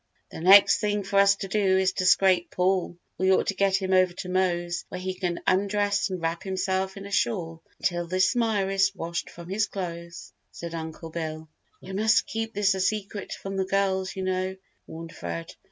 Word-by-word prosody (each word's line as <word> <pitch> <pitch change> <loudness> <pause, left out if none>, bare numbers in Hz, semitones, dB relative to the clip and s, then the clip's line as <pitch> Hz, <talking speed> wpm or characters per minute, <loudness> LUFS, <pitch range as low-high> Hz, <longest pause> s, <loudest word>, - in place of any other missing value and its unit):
"The - - -8
next 195 +3 +7
thing 205 -1 0
for 195 +1 +1
us 200 0 +6
to 195 - -6
do 195 -1 +2
is 190 0 +2
to 185 -2 0
scrape 180 -1 +4
Paul. 180 -1 0 0.2
We 190 +1 +3
ought 190 - +3
to - - 0
get 195 0 +2
him 190 -1 0
over 185 -1 +4
to 180 0 -7
Mose 175 -2 0
where - - -6
he 185 +1 -3
can 180 -2 -3
undress 205 +2 +1
and 185 -1 -4
wrap 165 0 -2
himself 190 0 -2
in 195 - -8
a 200 - -9
shawl 180 -5 -1 0.2
until 175 -1 -1
this 185 +6 +2
mire 215 -5 +1
is 195 0 +2
washed 170 0 -4
from 170 0 -11
his 205 +3 0
clothes," 170 -3 -7 0.2
said 170 -1 -8
Uncle 160 0 -6
Bill. 160 -1 -5 0.3
"We 190 - -8
must 215 +3 +3
keep 225 -1 -4
this 200 -1 +3
a 190 - -4
secret 205 0 -2
from 195 0 -6
the 190 - 0
girls, 190 -1 0
you 190 - -4
know," 185 0 -1 0.3
warned 165 +1 -9
Fred. 85 -1 -6
190 Hz, 200 wpm, -26 LUFS, 175-195 Hz, 0.3 s, next